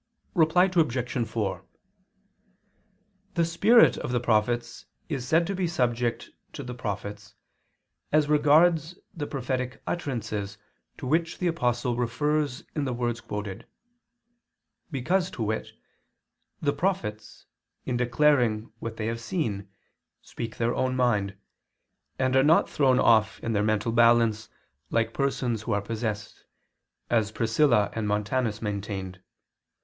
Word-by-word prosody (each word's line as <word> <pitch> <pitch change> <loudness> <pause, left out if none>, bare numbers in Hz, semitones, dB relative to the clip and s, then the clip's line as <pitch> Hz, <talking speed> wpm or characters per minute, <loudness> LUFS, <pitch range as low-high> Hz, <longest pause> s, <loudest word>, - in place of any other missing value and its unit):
Reply 170 0 +4
Obj. 130 -9 0
4: 105 -4 -3 1.7
The 170 - +3
spirit 205 +8 +5
of - - -4
the 125 - +1
prophets 120 +1 0 0.2
is 135 -6 -3
said 165 +4 +3
to 195 - -2
be 185 -2 -1
subject 120 -6 -1 0.2
to - - -6
the 125 - -6
prophets 105 -2 -6 0.8
as 150 -1 +3
regards 155 +3 +4 0.2
the 150 -3 -4
prophetic 130 -1 -3
utterances 110 - -3 0.4
to - - -7
which 165 +5 0
the 180 - -3
Apostle 125 -7 0
refers 140 +3 0
in 150 -3 -1
the 130 - -2
words 120 -1 -2
quoted; 105 -2 -6 1.2
because, 170 +6 0
to 115 - -4
wit, 110 +1 -2 1.0
the 145 -1 +2
prophets 170 - -3 0.4
in 125 - -1
declaring 120 -3 +2
what 115 -1 -6
they 110 - -3
have 115 +1 -3
seen 110 - -3 0.5
speak 115 -2 -7
their 120 +1 +1
own 130 0 0
mind, 105 -6 +1 0.8
and 130 0 +1
are 135 - +6
not 155 +4 +4
thrown 130 -3 +3
off 110 -3 +4
their 110 -3 0
mental 110 +1 +1
balance, 115 -2 +3 0.4
like 115 0 0
persons 125 -5 -1
who - - -2
are 100 - +2
possessed, 110 0 -4 0.7
as 110 -3 +2
Priscilla 115 -1 +2
and 110 -2 -2
Montanus 105 +2 -1
maintained. 100 -3 -4
120 Hz, 125 wpm, -27 LUFS, 110-145 Hz, 1.7 s, are